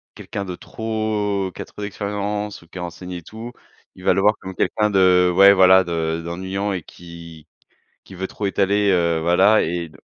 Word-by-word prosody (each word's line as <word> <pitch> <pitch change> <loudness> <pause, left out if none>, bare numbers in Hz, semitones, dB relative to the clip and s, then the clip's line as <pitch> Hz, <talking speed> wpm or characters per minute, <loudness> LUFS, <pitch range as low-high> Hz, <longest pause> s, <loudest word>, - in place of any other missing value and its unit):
quelqu'un 100 - -6
de 90 -2 -6
trop, 105 -3 -2
qui - - -7
a - - -6
trop - - -12
d'expérience 105 0 -4
ou 85 - -19
qui 85 - -12
est - - -5
renseigné 90 +1 -7
et - - -14
tout, 115 +6 -9 0.4
il 90 - -14
va - - +3
le 95 - 0
voir 105 +2 +4
comme 95 - -7
quelqu'un 105 +3 0
de 90 -2 +4
ouais 100 +2 +7
voilà 95 -1 +6
de 80 -1 -2
d'ennuyant 95 +4 -3
et 90 - -3
qui 85 -2 -13 0.6
qui 95 - -12
veut 95 +1 -4
trop 100 +1 -4
étaler, 100 +1 +1
heu, 85 -3 +1
voilà, 95 +6 +4
et 85 0 -3
don 75 - -18
95 Hz, 200 wpm, -21 LUFS, 85-105 Hz, 0.6 s, ouais